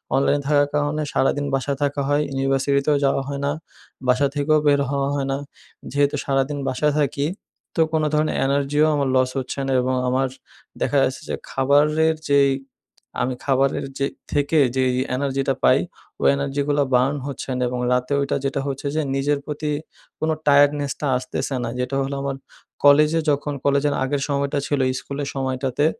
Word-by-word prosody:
অনলাইনে 140 +1 +2
থাকার 145 -1 +3
কারণে 150 +1 0
সারাদিন 145 +2 +1
বাসায় 135 +1 -2
থাকা 140 0 0
হয়, 145 +1 +2
ইউনিভার্সিটিতেও 140 +2 +1
যাওয়া 135 0 +2
হয় 140 0 -4
না। 145 - +1 0.6
বাসা 135 +3 +4
থেকেও 155 +2 +3
বের 140 -1 +4
হওয়া 140 0 0
হয় 135 -1 -1
না। 135 - 0 0.5
যেহেতু 145 +1 +2
সারাদিন 135 +1 0
বাসায় 145 +3 +1
থাকি 140 0 0 0.5
তো 165 - +2
কোনো 155 -1 +2
ধরণের 155 0 +1
এনার্জিও 140 +2 +2
আমার 140 -2 0
লস 130 0 +3
হচ্ছে 130 +2 -5
না - - -1
এবং 130 +1 0 0.2
আমার 130 +1 +1 0.5
দেখা 145 - +1
যাচ্ছে 130 0 -1
যে - - -1 0.2
খাবারের 150 +4 +3
যেই 140 -1 +5 0.7
আমি 130 0 -1
খাবারের 135 0 +1
যে, 140 - +1 0.3
থেকে, 145 +2 +2 0.2
যেই 130 -1 +2 0.2
এনার্জিটা 135 -1 -1
পাই, - - +5 0.4
ওই - - +4
এনার্জিগুলো 140 +1 0
বার্ন 135 +4 +3
হচ্ছেনা 130 -2 -3
এবং 125 0 -3
রাতে 125 +3 0
ওইটা 140 - 0
যেটা 140 0 -1
হচ্ছে 140 +1 -3
যে 155 - +2
নিজের 145 +1 +1
প্রতি 150 0 -3 0.5
কোনো 160 0 +1
টায়ার্ডনেস 145 0 +4
টা 145 - 0
আসতেছে 130 +1 -3
না। 115 - -2
যেটা 125 +2 -2
হলো 140 +1 -3
আমার 140 -1 -2 0.5
কলেজে 150 +3 +6
যখন 145 +1 -1
কলেজের 140 +1 +2
আগের 135 +1 -1
সময়টা 140 0 0
ছিলো 140 -2 +1 0.2
স্কুলের 140 0 -5
সময়টাতে। 130 +1 -1
140 Hz, 165 wpm, -22 LUFS, 135-145 Hz, 0.7 s, কলেজে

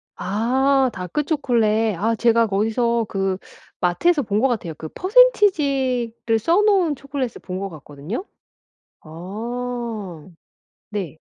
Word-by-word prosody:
아. 260 +6 +1
다크 180 - -3
초콜릿. 225 - +1
아 225 +4 +1
제가 230 0 +3
거기서 225 +3 +1
그 195 -1 -1 0.4
마트에서 290 - +2
본 210 0 0
것 270 - +3
같아요. 200 -10 -3
그 155 - -7
퍼센티지를 275 - +2
써 340 - +3
놓은 380 -8 +3
초콜릿을 275 -3 -5
본 185 0 -5
것 195 0 -4
같거든요. 155 - -7 0.8
아. 215 +1 -6 0.6
네. 185 -7 -5
230 Hz, 230 characters per minute, -21 LUFS, 195-270 Hz, 0.8 s, 제가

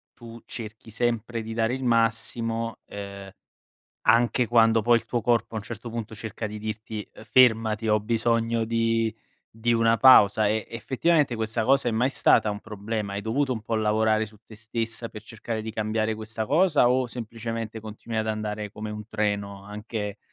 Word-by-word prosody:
tu 115 -1 -11
cerchi 110 -1 -8
sempre 115 0 -1
di 110 0 -6
dare 115 +2 0
il 130 - -6
massimo, 115 -1 0
ehm, 100 -1 -8 0.7
anche 120 +2 +3
quando 115 -2 +4
poi 120 +1 +5
il - - -14
tuo 120 -2 -1
corpo 115 0 +1
a - - -2
un 105 - -3
certo 120 +1 -7
punto 115 -1 -5
cerca 110 +1 -5
di 105 0 -7
dirti: 110 0 -6 0.2
"Fermati, 115 -2 +3
ho 105 0 +4
bisogno 115 +1 0
di 115 -1 0 0.3
di 115 +2 0
una 115 0 +3
pausa", 110 -5 +7
e 110 +1 0
effettivamente 135 +4 +1
questa 110 0 -1
cosa 135 -1 +3
è - - +1
mai 120 +4 +1
stata 110 - +4
un 105 0 -5
problema? 105 -1 -4
Hai 100 - -3
dovuto 130 +4 0
un 110 - -6
po' 115 0 -2
lavorare 110 0 +2
su 105 - -17
te 110 - -13
stessa 115 +1 -3
per 105 - -10
cercare 110 0 -5
di 110 - -5
cambiare 110 0 -1
questa 110 0 -4
cosa 150 - +4
o 130 0 +2
semplicemente 115 -1 -5
continui 110 +1 -6
ad 110 - -1
andare 105 -1 -3
come 105 0 -6
un 105 0 -7
treno, 100 -2 -2
anche 105 0 -5
110 Hz, 175 wpm, -26 LUFS, 110-115 Hz, 0.7 s, pausa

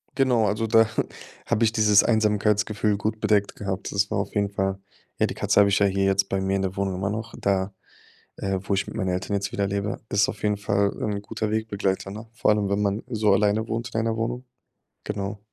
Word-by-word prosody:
Genau, 125 -5 +3
also, 105 +3 0
da 115 0 +5 0.6
habe 110 - +1
ich 110 - +4
dieses 105 -2 +5
Einsamkeitsgefühl 105 -1 +1
gut 110 +1 -2
bedeckt 105 -2 +1
gehabt. 95 -1 -4
Das 100 0 +1
war - - -1
auf - - -4
jeden 100 -1 +1
Fall, 95 -1 -1 0.4
ja, - - +4
die - - -4
Katze - - +2
habe 100 0 +6
ich 100 - +3
ja 100 - +4
hier 95 0 +1
jetzt 95 0 +2
bei 95 0 0
mir 95 0 0
in 100 - 0
der 95 0 -2
Wohnung 95 -1 -1
immer 95 +2 -2
noch 110 +3 -4
da, 95 0 0 0.6
äh, 95 -1 -1
wo 100 - -1
ich 100 +1 0
mit - - -8
meinen 95 - -1
Eltern 90 +3 -1
jetzt 100 0 -2
wieder 100 -1 -1
lebe. 100 +1 -2
Ist 100 0 +3
auf - - -6
jeden 105 -1 +1
Fall 100 0 +1
ein 100 -1 -2
guter 105 +1 -3
Wegbegleiter, 100 -3 -1
ne? 110 +3 -8
Vor 115 - +2
allem, 105 -2 +1
wenn 100 +1 +1
man 100 +1 0
so 110 -4 +1
alleine 105 +2 +2
wohnt 115 +2 -3
in 110 - +1
einer 115 0 -1
Wohnung. 120 +3 -3 0.6
Genau. 100 0 -4
100 Hz, 230 wpm, -25 LUFS, 100-110 Hz, 0.6 s, habe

